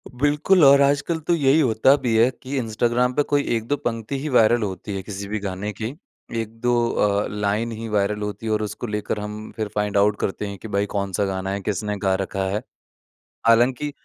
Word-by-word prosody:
बिल्कुल, 145 +7 +2
और 140 +1 +7
आजकल 145 +4 +1
तो 175 - +3
यही 145 -2 +3
होता 130 -1 +4
भी 115 -3 +1
है 115 +3 +5
कि 135 +2 -5
इंस्टाग्राम 120 +1 +1
पे 145 - +2
कोई 145 -1 +3
1-2 115 +5 -1
पंक्ति 120 -1 -3
ही 150 +3 -4
वायरल 120 -2 +4
होती 100 +1 -5
हैं 95 - -4
किसी 100 0 -6
भी 105 +1 -3
गाने 100 +1 -4
की। 110 +5 -5 0.5
1-2 115 +2 -2 0.2
अ, 105 0 +1
लाइन 105 +3 -1
ही 115 0 -6
वायरल 105 0 0
होती 105 +2 -5
हैं 110 - 0
और 105 - 0
उसको 105 +3 -5
लेकर 105 0 -3
हम 105 +1 -7
फिर 110 -1 -2
फाइंड 105 -1 0
आउट 105 +1 +4
करते 105 +2 -2
हैं 100 0 -6
कि 110 - -9
भाई 100 -1 0
कौन-सा 100 0 0
गाना 95 0 -3
है, 100 +1 -3
किसने 105 +1 -2
गा 95 -1 +3
रखा 95 0 -3
है। 105 +3 -1 0.9
हालाँकि, 125 +5 +3
110 Hz, 205 wpm, -23 LUFS, 105-125 Hz, 0.9 s, और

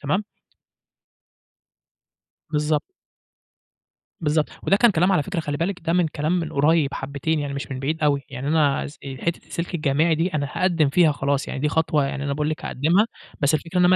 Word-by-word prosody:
تمام؟ 190 +9 0 2.3
بالضبط. 150 0 +1 1.4
بالضبط. 150 -1 +1
وده 195 - +3
كان 240 +3 +5
كلام 180 +1 +2
على 165 - +3
فكرة 195 +1 -3
خلّي 145 -2 -3
بالِك 175 +4 -2
ده 165 - +2
من 175 -2 +3
كلام 150 +2 -2
من 165 - -5
قريِّب 150 0 +2
حبتين 140 +3 -2
يعني 140 -1 -3
مش 140 - -5
من 130 -1 -4
بعيد 155 +4 -2
أوي، 145 -2 +2
يعني 135 +1 -4
أنا 150 -3 +2
س 145 - -12
آآ، 135 -1 -6
حتّة 170 0 -2
السِلك 170 +1 -5
الجامعي 155 +1 +2
دي 165 +3 -1
أنا 145 -2 0
هاقدِّم 170 -5 +2
فيها 160 +1 +4
خلاص، 140 0 -1
يعني 130 - -4
دي 150 - +1
خطوة 155 -1 +1
يعني 140 0 -4
أنا 140 - -1
باقول 150 +2 -1
لِك 155 - -5
هاقدِّمها، 170 - +2 0.3
بس 145 +2 +3
الفكرة 170 +4 -1
إن 180 - +5
أنا - - +6
155 Hz, 195 wpm, -23 LUFS, 140-170 Hz, 2.3 s, أنا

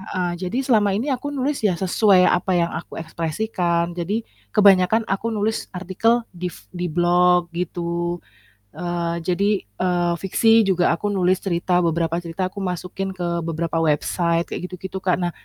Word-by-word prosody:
Heeh, 185 -2 -2 0.2
jadi 245 - -2
selama 210 -5 +3
ini 250 +7 -2
aku 270 +3 -5
nulis 275 +2 -1
ya 185 - +2
sesuai 190 0 +4
apa 180 +1 +1
yang 170 0 +1
aku - - -11
ekspresikan, 170 +1 -1
jadi, 200 +7 -2 0.3
kebanyakan 200 +2 +5
aku 195 +4 -1
nulis 215 +1 -1
artikel 210 +6 +1
di 180 0 -5
f 100 - -15
di 180 0 -3
blog 175 +1 +3
gitu, 175 0 -2 0.6
eee, 175 -1 -2
jadi, 195 +3 +2 0.2
eee, 175 - 0
fiksi 225 +4 +4
juga 180 -2 +3
aku 205 - -3
nulis 185 -1 +2
cerita, 180 -1 +1
beberapa 165 0 0
cerita 170 +3 -3
aku 200 - -9
masukin 180 +2 -3
ke 170 -1 -1
beberapa 165 0 -2
website 170 +2 +1
kayak - - -4
gitu - - -5
gitu 190 - -5
Kak, 180 - +3
nah, 175 0 0
180 Hz, 165 wpm, -22 LUFS, 170-195 Hz, 0.6 s, kebanyakan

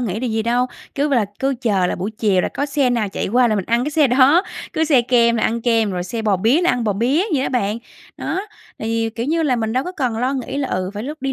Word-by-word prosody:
nghĩ 220 -3 -2
điều 250 -2 -2
gì 220 0 0
đâu. 240 +2 +1 0.3
Cứ 290 +1 0
b 285 - -2
là 235 -5 +3
cứ 270 0 0
chờ 200 -7 +1
là - - -1
buổi 190 +4 -4
chiều 210 -4 +1
là - - -1
có 285 - -3
xe 275 -3 +1
nào 230 -4 0
chạy - - -3
qua 245 +3 +3
là 215 - +1
mình 195 - -2
ăn 235 +4 +1
cái 295 - -2
xe 300 -1 +3
đó, 265 +7 +5 0.3
cứ 320 - +1
xe 285 -6 +4
kem 235 -1 +3
là 220 - -1
ăn 235 +1 0
kem, 225 -3 +2
rồi 180 -2 -3
xe 225 +5 -4
bò 210 -3 +2
bía 240 - +2
là 360 - +3
ăn 245 -2 -1
bò 210 - +1
bía 245 - +1
vậy 265 - +1
đó - - -1
bạn. 220 -4 -1 0.4
Đó, 335 +5 -3 0.4
thì, 225 0 -1
kiểu 230 +2 -4
như 325 +3 +1
là, 270 -5 +1
mình 220 -1 -2
đâu 255 +2 0
có 360 - -5
cần 255 -10 -2
lo 255 +3 0
nghĩ 265 +1 -4
là, 280 -2 -1
ừ, 185 0 -2
phải 205 - -4
lúc 295 +3 -7
đi 270 - -1
240 Hz, 300 wpm, -19 LUFS, 220-275 Hz, 0.4 s, đó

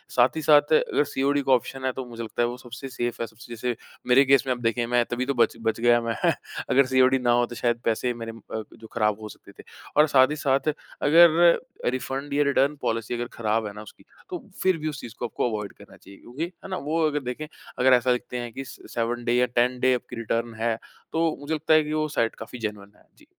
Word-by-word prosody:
साथ 125 +4 +4
ही 160 - -2
साथ 150 +1 +5
अगर 150 - +3
सीओडी 140 +1 0
का 135 -1 0
ऑप्शन 130 +1 +1
है 130 - +1
तो 130 0 -6
मुझे 115 -1 -7
लगता 110 +2 -3
है 120 - +3
वो 120 +1 -5
सबसे 125 +2 -9
सेफ 120 -1 -3
है, 115 - -2
सबसे 115 +2 -12
जैसे 120 +1 -2 0.3
मेरे 130 +3 +6
केस 135 -1 +5
में 130 - +2
आप 120 - -7
देखें 115 +1 0
मैं 120 0 +3
तभी 120 +2 -2
तो 140 - 0
बच 120 - +3
बच 115 0 -1
गया 120 0 +4
मैं 115 -1 -2 0.5
अगर 140 +1 +5
सीओडी 130 0 +4
ना 120 -1 +2
हो 120 0 +3
तो 120 - -9
शायद 120 0 0
पैसे 120 +2 0
मेरे 115 -1 -6 0.2
अ, 110 - -3
जो 110 - -12
ख़राब 105 -2 +1
हो 105 - -7
सकते - - -14
थे। - - -10 0.3
और 150 +1 +7
साथ 130 -2 +5
ही - - -1
साथ 140 0 +1 0.3
अगर 170 +2 +6 0.3
रिफंड 135 +3 -4
या 145 +1 +3
रिटर्न 140 +1 +2
पॉलिसी 115 +1 -2
अगर 120 0 -3
ख़राब 110 -1 0
है 100 - -7
ना 105 - -9
उसकी, 110 - -15 0.2
तो 355 - -7
फिर 185 -2 +3
भी 155 0 -4
उस 145 -2 -6
चीज़ 115 - -9
को - - -2
आपको 120 - -1
अवॉइड 105 -3 -4
करना - - -16
चाहिए 100 0 -16
क्योंकि, 130 +7 -6
है 180 +2 -8
ना? 185 - -2
वो 160 +2 -1
अगर 150 -1 -1
देखें 150 +5 -5 0.3
अगर 130 +1 +5
ऐसा 125 0 +4
लिखते 125 0 -2
हैं 120 -1 -5
कि 135 - -5
7 120 0 -4
डे 120 - +2
या 125 +1 +4
10 125 +1 +1
डे 130 0 +4
आपकी 125 - -7
रिटर्न 115 0 -2
है, 115 +1 0 0.4
तो 165 -1 +1
मुझे 145 +2 -3
लगता 155 +1 +1
है 155 - +6
कि 150 +1 -4
वो 155 0 0
साइट 115 -1 +1
काफ़ी 125 - -9
जेनुइन 105 -2 -5
है, - - -24
जी। - - -20
125 Hz, 250 wpm, -25 LUFS, 115-140 Hz, 0.5 s, और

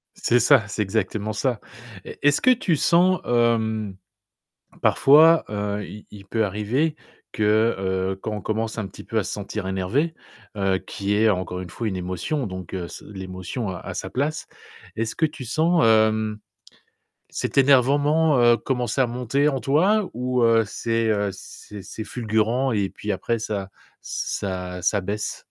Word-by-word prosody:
C'est 120 - +2
ça, 120 -2 +5
c'est 105 0 -2
exactement 105 +1 -2
ça. 120 +2 -1 0.4
Et, - - -10
est-ce 145 0 +4
que 255 - +4
tu 210 -10 +2
sens, 180 +5 +3
hem, 110 -4 +1 0.9
parfois, 160 +4 +6
heu, 105 0 -3
il 105 - -11
il 100 -2 -12
peut 110 +2 0
arriver, 110 - -1 0.4
que, 110 +2 +2
heu, 95 0 -1
quand 110 - -4
on 105 - -5
commence 110 +3 -2
un 110 - -2
petit 95 - -12
peu 115 - -3
à 110 - +2
se - - -5
sentir 105 -1 -5
énervé, 95 - 0 0.4
heu, 95 -1 +1
qui 100 0 -3
est, 110 +1 +4
encore 90 -1 -2
une 90 - -8
fois, 115 +6 -4
une 100 - -2
émotion 95 - -3
donc, 95 -3 -7
heu, 90 -2 -3
s - - -10
l'émotion, 95 +2 -5
heu, 90 - -6
a - - -7
sa - - -5
place, 150 +4 -2 0.5
est-ce 110 0 -2
que 160 - +2
tu 150 -4 -6
sens, 160 +7 +2
hem, 110 -1 +3 0.9
cet - - -2
énervement, 145 +3 +4
heu, 120 0 +6
commencer 125 +1 -2
à 130 - +4
monter 125 +4 0
en 135 -3 -1
toi? 185 +10 +2
Ou, 125 +1 0
heu, 115 -1 +4
c'est, 115 +2 -1
heu, 105 -2 +1
c'est 100 +1 -11
c'est 110 +3 -7
fulgurant 115 +3 0
et 100 -3 0
puis 105 - -7
après 115 +4 -1
ça 100 -3 -4 0.3
ç - - -3
ça 90 -2 -4
ça 100 +4 +2
baisse? 105 +3 -4
110 Hz, 170 wpm, -23 LUFS, 100-130 Hz, 0.9 s, parfois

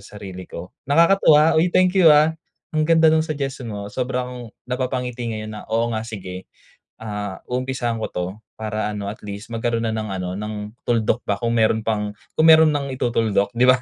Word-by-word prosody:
sarili 100 -3 -10
ko." 90 +2 -8 0.2
Nakakatuwa, 160 -1 +5
uy, 180 - +3
thank 185 +1 +3
you, 185 -4 +6
ah, 150 +1 +6 0.4
ang 155 0 0
ganda 160 -1 +5
ng 160 - +4
suggestion 140 -5 -4
mo 100 -1 -6
sobra 125 0 -2
akong 125 -2 -8 0.2
napapangiti 125 -1 -3
ngayon 110 -1 -5
na, 105 - -7
"Oo 115 +1 0
nga 110 - -1
sige." 95 -4 -8 0.5
Ah, 105 -3 -5
umpisahan 125 -2 -2
ko - - -1
'to 90 0 -3 0.3
para 110 -1 -2
ano 100 -1 -4
at 105 - -8
least 100 +3 -7
magkaroon 115 0 -1
na 110 - 0
ng 110 -1 -3
ano, 90 -1 -3
ng 105 0 -6
tuldok 115 0 +1
pa 100 - +1
kung 115 0 0
meron 110 0 +2
pang 105 -2 -2 0.2
kung 160 - +5
meron 160 -1 +8
nang 145 -1 -1
itutuldok 115 -5 +1
'di 120 +2 +3
ba? 130 - +6
115 Hz, 190 wpm, -22 LUFS, 105-135 Hz, 0.5 s, meron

